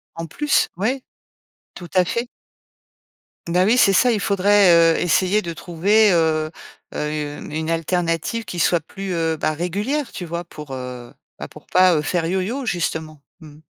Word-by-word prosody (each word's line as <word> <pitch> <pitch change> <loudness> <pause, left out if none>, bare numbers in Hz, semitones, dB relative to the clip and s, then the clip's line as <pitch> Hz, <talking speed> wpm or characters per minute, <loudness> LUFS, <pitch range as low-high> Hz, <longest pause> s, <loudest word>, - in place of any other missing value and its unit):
En 165 - -5
plus, 295 - +1
ouais. 250 +7 -1 0.7
Tout 175 - -10
à 185 -1 +4
fait. 235 +6 -2 1.2
Ben, 180 +2 +2
oui, 220 +4 +4
c'est 200 - +5
ça. 245 +6 +4
Il 220 - 0
faudrait, 200 -1 +4 0.2
heu, - - -1
essayer 185 +4 +2
de 170 -4 -5
trouver, 195 +6 +2
heu 155 -2 +1 0.4
heu, 150 -1 -3
une 160 +2 -3
alternative 165 +5 -1
qui 175 - -6
soit 170 +1 +2
plus, 190 +4 -6
heu, 165 -1 0
bah, 155 0 -1
régulière, 205 - -2
tu 180 - -6
vois, 170 +1 -4
pour, 150 -4 -11
heu 125 -2 -8 0.3
bah, - - -6
pour - - -15
pas, 185 -1 +4
heu, 150 - +1
faire 165 +2 -1
yoyo, 190 +10 -2
justement. 160 -4 -3 0.2
Mmh 160 - -13
mh. 150 - -19
175 Hz, 170 wpm, -21 LUFS, 160-200 Hz, 1.2 s, c'est